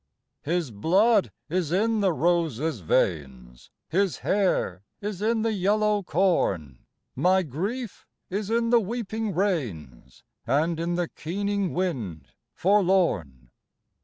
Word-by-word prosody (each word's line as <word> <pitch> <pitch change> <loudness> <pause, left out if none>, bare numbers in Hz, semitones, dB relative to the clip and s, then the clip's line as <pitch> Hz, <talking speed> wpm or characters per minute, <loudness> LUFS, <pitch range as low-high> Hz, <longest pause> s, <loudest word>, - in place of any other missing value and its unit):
His 165 -3 -1
blood 190 - +3 0.2
is 170 -1 -1
in 220 +4 +2
the 195 -3 +3
rose's 160 -5 0
veins, 65 - -1 0.2
His 195 0 +1
hair 185 - +1 0.2
is 205 -2 -5
in 220 +1 +1
the 225 -1 +1
yellow 210 +2 +2
corn. 150 - 0 0.3
My 185 +1 +3
grief 195 - -5 0.2
is 200 +2 -3
in 230 0 +1
the 240 - +6
weeping 220 -1 -3
rains 120 - -3 0.2
And 155 +6 +1
n 170 +1 -1
the 175 -1 0
keening 200 +4 -2
wind 125 - -3 0.3
forlorn. 175 - +1
180 Hz, 115 wpm, -26 LUFS, 135-205 Hz, 0.3 s, the